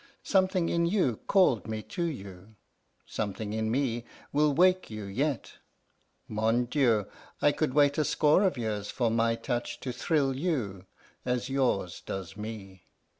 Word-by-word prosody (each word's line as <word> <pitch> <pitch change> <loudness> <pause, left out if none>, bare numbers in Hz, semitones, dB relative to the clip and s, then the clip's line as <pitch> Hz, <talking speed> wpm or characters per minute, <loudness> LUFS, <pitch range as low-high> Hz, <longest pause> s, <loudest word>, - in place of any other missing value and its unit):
Something 185 -3 +2
in 170 0 +2
you 170 - +1
called 180 - +3
me 110 -1 -4
to 180 - -6
you, 100 - -5 0.5
something 105 0 -4
in 110 0 -1
me 120 -1 0 0.3
will 150 +1 +4
wake 180 +5 +3
you 110 -1 -6
yet. 130 +7 -2 0.7
Mon 110 +3 +1
Dieu, 120 -6 +2 0.3
I 145 - +4
could 145 -3 -1
wait 145 0 +4
a - - +4
score 150 +4 +3
of 190 -8 +2
years 105 -3 -3
for 120 -3 0
my 115 0 +2
touch 120 +1 -3
to 130 - -3
thrill 135 +1 +1
you 120 - -2 0.4
as 125 0 -1
yours 125 -10 0
does 95 -1 -6
me! 100 -4 -8
120 Hz, 150 wpm, -29 LUFS, 110-150 Hz, 0.7 s, will